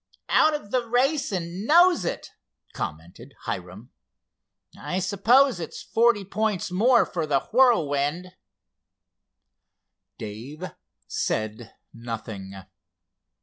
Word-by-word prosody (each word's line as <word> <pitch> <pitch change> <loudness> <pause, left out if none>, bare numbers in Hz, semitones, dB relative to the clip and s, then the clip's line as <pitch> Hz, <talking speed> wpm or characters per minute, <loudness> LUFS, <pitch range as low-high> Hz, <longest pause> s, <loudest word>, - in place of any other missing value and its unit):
"Out 310 -1 +4
of 205 -9 -8
the 255 -1 +1
race 270 +3 +1
and 180 +2 -4
knows 345 - +5
it," - - -4 0.4
commented 85 - -7
Hiram. 105 +2 -6 0.8
"I 180 - -4
suppose 205 +6 +3
it's 165 - -7
forty 230 -3 +2
points 205 -2 -2
more 235 +7 +4
for 165 -4 -3
the 140 -2 +2
Whirlwind." 175 - +2 1.9
Dave 125 - -7 0.4
said 110 +1 -3 0.2
nothing. 110 -4 -7
180 Hz, 95 wpm, -25 LUFS, -, 1.9 s, knows